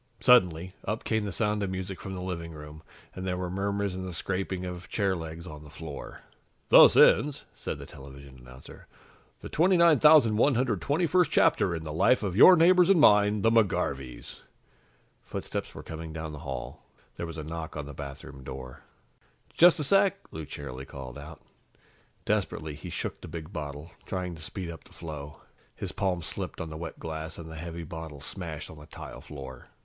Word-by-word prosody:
Suddenly, 95 -8 +4
up 105 +3 -3
came 110 -2 0
the 100 - -3
sound 105 +1 0
of 100 - -1
music 95 0 -5
from 95 -1 -6
the 90 - -5
living 85 -3 -5
room 75 0 -10 0.3
and 95 - -7
there 90 -1 -2
were 90 -1 -3
murmurs 100 +1 -1
and 95 0 -5
the 90 -2 -6
scraping 95 +1 -3
of 90 0 -7
chair 100 -3 +1
legs 80 0 -7
on 75 -4 -9
the 75 - -13
floor. 75 -1 -8 0.5
"Thus - - +9
ends," 145 -1 +5
said - - -5
the - - -9
television 70 -1 -12
announcer, 65 +1 -13 0.5
"the - - -7
29,121st 150 - +4
chapter 85 - +3
in 80 - -5
the 75 -1 -5
life 115 +10 +3
of 95 -3 -2
your 180 - +9
neighbors 180 +2 +5
and 195 -4 +6
mine, 105 -5 +5
the 115 - +4
McGarveys." 70 - 0 0.8
Footsteps - - -5
were - - -8
coming 80 0 -7
down 80 0 -5
the 75 - -8
hall. 70 -4 -6 0.3
There 85 - -4
was 85 -1 -8
a 80 - -5
knock 80 0 -6
on 75 - -4
the 75 - -8
bathroom 70 -1 -9
door. 65 -1 -8 0.7
"Just 175 -1 +6
a - - 0
sec," 195 +5 +4
Lou 80 -1 -6
cheerily 65 -2 -7
called 65 -1 -9
out. 75 +2 -11 0.8
Desperately, 80 -1 -1
he 75 - -8
shook - - -4
the - - -8
big 80 -2 -8
bottle, 75 0 -6 0.2
trying 90 -2 -3
to 80 - -10
speed 85 +1 -6
up 80 - -11
the - - -18
flow. 75 -3 -8 0.3
His - - -5
palms 90 -4 -1
slipped - - -5
on 80 -1 -5
the - - -6
wet 80 0 -6
glass, 80 0 -6
and 80 -1 -9
the - - -8
heavy 85 +1 -6
bottle 80 -2 -8
smashed 80 0 -6
on 80 - -12
the 75 - -13
tile - - -9
floor. 65 -3 -10
85 Hz, 185 wpm, -28 LUFS, 75-100 Hz, 0.8 s, Thus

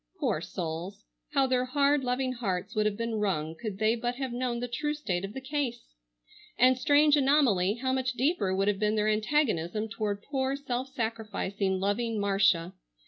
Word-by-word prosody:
Poor - - 0
souls! 180 +4 -5 0.3
How 275 -2 +4
their 255 -1 +1
hard, 280 +2 +2
loving 255 +1 0
hearts 200 -4 -3
would 215 -2 +2
have 205 -1 -2
been 230 -1 -2
wrung 160 -7 -1
could 215 0 -5
they 220 +2 +2
but 240 +1 -2
have 265 -1 -4
known 245 -1 -2
the 245 - -3
true 295 +5 -2
state 195 -12 -2
of 195 +1 -5
the 265 - -5
case! 265 -3 -2 0.7
And, 255 +1 +5
strange 290 +3 +4
anomaly, 265 -10 +3
how 260 +2 -1
much 260 -1 0
deeper 250 - +1
would 195 +1 +1
have 205 -2 +1
been 210 0 +1
their 210 0 +1
antagonism 215 - 0
toward 210 -2 -3
poor, 270 -1 -1
self 260 -2 -3
sacrificing, 215 -5 -2
loving 215 +3 0
Marcia! 195 -3 +2
230 Hz, 180 wpm, -29 LUFS, 200-260 Hz, 0.7 s, And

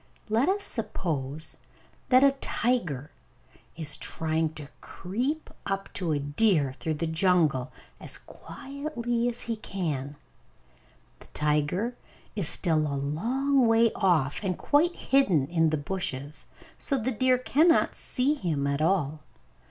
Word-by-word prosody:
Let 230 +9 +2
us 400 +1 0
suppose 160 - -3 0.5
that 255 +1 +6
a 280 - +7
tiger 230 - -1 0.6
is 155 -3 +1
trying 160 0 -1
to 150 -2 -7
creep 255 - -3 0.2
up 195 0 -3
to 175 -4 -2
a 150 - +1
deer 145 0 +2
through 155 +3 -3
the 150 - -2
jungle, 160 -6 +2 0.3
as - - -2
quietly 245 -4 -4
as 240 0 -5
he 230 - -2
can. 150 -10 -4 1.0
The - - -13
tiger 150 +10 0 0.4
is 195 -8 +2
still 165 -4 +3
a 140 - -2
long 245 - +1
way 225 0 +4
off, 160 -8 +2
and 185 -3 -1
quite 325 +4 +2
hidden 195 - +2
by 165 +2 +2
the 155 - 0
bushes, 145 -3 -4 0.3
so 275 - 0
the 255 +1 -1
deer 255 +2 +3
cannot 310 +6 +3
see 265 +4 0
him 165 - -2
at 140 +1 0
all. 155 -3 +1
185 Hz, 135 wpm, -27 LUFS, 150-245 Hz, 1.0 s, a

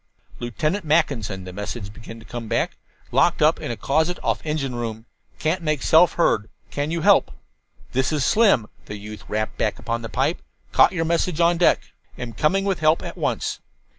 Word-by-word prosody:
"Lieutenant 155 - -2
Mackinson," 140 - 0
the 90 0 -8
message 105 +1 -6
began 115 0 -10
to 115 - -14
come 120 -2 -6
back. - - 0 0.4
"Locked - - +3 0.2
in 120 - -4
closet 160 +5 +1
off - - 0
engine 150 -4 -2
room. 115 -2 -4 0.3
Can't 165 +3 0
make 155 -4 -1
self 165 +2 +5
heard. 110 - +1 0.2
Can 145 +1 -2
you 165 0 -2
help?" 200 +3 +4 0.6
"This 130 +3 +1
is 150 -4 +1
Slim," 205 - +4 0.2
the 105 - -6
youth 105 +1 -9
rapped 110 0 -3
back 110 - 0
upon 115 0 -3
the 115 - -6
pipe. - - 0 0.3
"Caught - - +5
your 165 -2 -1
message 170 0 0
on 170 0 +4
deck. 175 - +2 0.3
Am 125 -2 -6
coming 170 - +1
with 195 -2 0
help 155 +1 +3
at - - -6
once." - - -2
140 Hz, 180 wpm, -23 LUFS, 110-165 Hz, 0.6 s, self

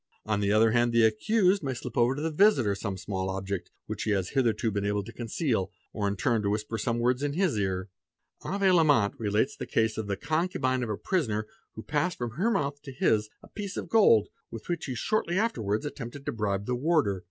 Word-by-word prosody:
On 105 -1 0
the 100 0 +1
other 110 +1 +4
hand 120 0 +2
the 115 -1 +5
accused 185 - +2
may 135 -4 -3
slip 120 - -7
over 120 +2 +3
to 145 - -4
the 160 - -1
visitor 150 - +4
'some 100 -1 -4
small 95 0 -3
object 95 0 -4 0.2
which - - -5
he - - -2
has 95 -3 0
hitherto 115 -4 +1
been 100 0 -2
able 105 0 0
to 115 +4 -10
conceal, 115 - -1 0.2
or 105 -2 -1
in 100 - -1
turn 115 0 +1
to 100 - 0
whisper 105 +2 -2
some 115 -2 -1
words 125 +2 +1
in 145 0 -1
his 180 - +1
ear. 95 -1 -1 0.5
Avé 195 -1 +1
Lallemant 145 - +4
relates 105 +3 0
the - - -6
case 110 -1 +1
of 110 - -4
the 100 -1 -2
concubine 145 - 0
of 120 - -3
a 105 - -2
prisoner 110 - -1 0.3
who 110 - -7
passed 160 +4 -1
from 120 -2 -3
her 180 - 0
mouth 145 -9 -1
to 140 - -9
his 110 -4 +1
a - - -13
piece 200 -2 -6
of - - -5
gold, 115 - +5 0.2
with 115 - -9
which 170 -2 -2
he 130 - -4
shortly 175 - 0
afterwards 115 - 0
attempted 140 -1 -7
to - - -1
bribe 100 -3 -2
the 125 - -1
warder. 125 - +1
115 Hz, 225 wpm, -28 LUFS, 105-150 Hz, 0.5 s, the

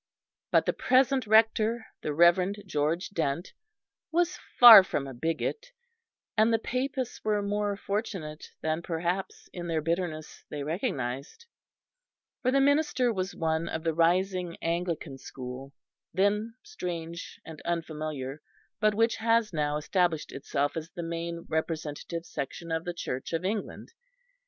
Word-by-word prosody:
But - - +4
the - - +1
present 260 -1 +3
Rector, 220 +1 +3 0.2
the 150 - -2
Reverend 180 +6 +4
George 160 +1 -1
Dent, 165 -2 -2 0.6
was 345 +2 +1 0.2
far 230 -5 +12
from 145 -6 -2
a 135 - -7
bigot; 165 - -2 0.7
and 220 +1 +4
the 225 - +4
Papists 255 +2 -3
were 210 -1 +1
more 205 0 -1
fortunate 190 -8 -4
than 160 +1 -1
perhaps, 175 +3 -3
in 175 -1 -5
their 165 -2 0
bitterness, 165 -1 -3
they 145 -1 -4
recognised; 145 - -3 1.0
for 255 - +1
the 275 +2 +3
minister 280 -3 +3
was 190 -1 -3
one 160 0 -1
of 160 - -4
the 165 -1 +1
rising 180 +1 +1
Anglican 165 -4 -2
school, 130 +1 -8 0.4
then 210 +4 +1
strange 170 - -6
and 160 -2 -9
unfamiliar, 155 -4 -4 0.4
but 215 -1 +3
which 230 +2 +2
has 225 -2 +2
now 150 -1 0
established 165 0 0
itself 140 +1 -2
as 160 0 -5
the 175 - -6
main 170 0 -4
representative 160 +1 -3
section 165 +4 -5
of 160 0 -1
the 175 - -3
Church 130 -2 -4
of 165 +2 -1
England. 205 +1 -3
170 Hz, 135 wpm, -28 LUFS, 160-215 Hz, 1.0 s, far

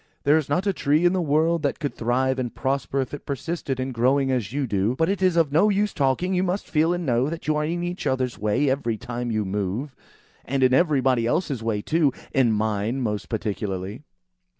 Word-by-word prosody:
"There 145 +2 +4
is 150 - -5
not 180 +7 +1
a 200 - +2
tree 155 +1 +2
in 175 - +4
the 185 - +1
world 160 +2 +2
that 140 -2 -1
could 145 -4 -3
thrive 130 +3 0
and 120 -2 -3
prosper, 135 0 -1
if 130 - -5
it 145 - -6
persisted 140 -1 -3
in 130 +1 -2
growing 135 +3 +2
as 120 -5 -1
you 140 +1 -1
do. 105 +1 0
But 160 +5 +1
it 195 -1 -1
is 185 -2 +3
of 160 -4 +3
no 175 +8 +4
use 205 0 +1
talking! 145 +6 +1
You 180 - +2
must 185 +2 -2
feel 160 +2 +2
and 175 -1 -2
know 125 +1 +1
that 165 +1 -6
you 155 - +2
are 150 0 0
in 175 +2 -2
each 175 +1 -3
other's 130 -3 -1
way 105 +7 +1
every 130 -4 0
time 120 +2 -4
you 110 -2 -1
move; 105 +8 -3 0.5
and 135 0 -1
in 130 0 +4
everybody 130 -6 +3
else's 140 -3 -1
way 110 -2 -1
too. 155 -3 +2 0.2
In 130 -4 +3
mine, 110 +3 -1
most 105 -4 -3
particularly." 105 0 -3
135 Hz, 220 wpm, -24 LUFS, 120-160 Hz, 0.5 s, There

